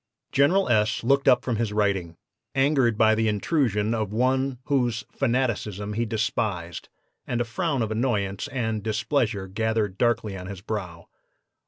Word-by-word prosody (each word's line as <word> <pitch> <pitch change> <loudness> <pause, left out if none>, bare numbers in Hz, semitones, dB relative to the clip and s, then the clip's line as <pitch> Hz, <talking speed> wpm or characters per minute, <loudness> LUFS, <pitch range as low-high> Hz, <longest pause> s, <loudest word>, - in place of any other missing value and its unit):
"General 170 +9 +3
S. 110 -2 +2
looked 140 +3 +2
up 125 -2 +5
from 120 -4 -1
his 115 -2 -1
writing, 100 -5 0 0.4
angered 135 -5 +3
by 110 0 +5
the 110 0 +1
intrusion 105 - +1
of 110 -3 -2
one 130 +3 +1
whose 120 -5 0
'fanaticism' 105 -5 -1
he 115 +2 -1
despised, 105 -6 -2 0.4
and 120 - -1
a - - +2
frown 140 +1 -1
of 110 - -3
annoyance 105 -4 -1
and 115 -4 -2
displeasure 110 -1 -1
gathered 110 -1 -1
darkly 115 -4 +1
on 90 -1 -7
his 95 -2 -7
brow. 90 -5 -5
110 Hz, 150 wpm, -25 LUFS, 105-125 Hz, 0.4 s, up